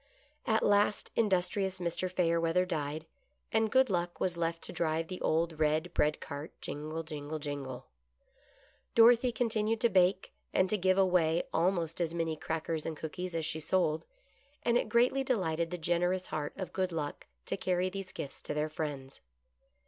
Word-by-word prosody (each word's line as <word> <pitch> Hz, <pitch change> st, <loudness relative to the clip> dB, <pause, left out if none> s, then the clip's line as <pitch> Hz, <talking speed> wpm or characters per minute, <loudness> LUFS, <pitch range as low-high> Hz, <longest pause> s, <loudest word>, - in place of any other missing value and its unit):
At 220 Hz, -2 st, +3 dB
last 205 Hz, 0 st, +2 dB
industrious 190 Hz, -2 st, +1 dB
Mr. 180 Hz, +1 st, -2 dB
Fayerweather 170 Hz, 0 st, +2 dB
died, 155 Hz, -2 st, -3 dB, 0.5 s
and 220 Hz, 0 st, +2 dB
Good 260 Hz, +3 st, +5 dB
Luck 175 Hz, -2 st, -1 dB
was 180 Hz, -2 st, 0 dB
left 165 Hz, 0 st, -2 dB
to -, -, -6 dB
drive 160 Hz, 0 st, 0 dB
the 185 Hz, -, -6 dB
old 160 Hz, 0 st, +1 dB
red 155 Hz, +3 st, +1 dB
bread 150 Hz, +1 st, +2 dB
cart, 145 Hz, +1 st, -6 dB
jingle, 155 Hz, +2 st, -4 dB
jingle, 155 Hz, -1 st, -5 dB
jingle, 140 Hz, -4 st, -5 dB, 1.1 s
Dorothy 235 Hz, +2 st, +6 dB
continued 225 Hz, -2 st, 0 dB
to 235 Hz, -, +4 dB
bake, 185 Hz, 0 st, +2 dB, 0.2 s
and 185 Hz, -, +3 dB
to -, -, +3 dB
give 185 Hz, +1 st, +3 dB
away 175 Hz, -3 st, +3 dB
almost 170 Hz, -1 st, +1 dB
as 170 Hz, 0 st, -1 dB
many 165 Hz, -1 st, -1 dB
crackers 160 Hz, 0 st, -3 dB
and 160 Hz, -2 st, -4 dB
cookies 175 Hz, +3 st, -5 dB
as 165 Hz, -1 st, -1 dB
she 160 Hz, -, -2 dB
sold, 160 Hz, -1 st, +1 dB, 0.6 s
and 235 Hz, 0 st, +2 dB
it 245 Hz, -, +1 dB
greatly 250 Hz, +3 st, +3 dB
delighted 170 Hz, -10 st, 0 dB
the 180 Hz, -, -4 dB
generous 175 Hz, +2 st, +1 dB
heart 145 Hz, -1 st, -3 dB
of 190 Hz, -2 st, -5 dB
Good 185 Hz, -1 st, 0 dB
Luck 150 Hz, -3 st, -4 dB, 0.2 s
to -, -, -1 dB
carry 185 Hz, 0 st, 0 dB
these 195 Hz, -1 st, -5 dB
gifts 140 Hz, -, -6 dB
to -, -, -4 dB
their 150 Hz, +1 st, 0 dB
friends. 145 Hz, -4 st, -5 dB
170 Hz, 165 wpm, -32 LUFS, 155-190 Hz, 1.1 s, Dorothy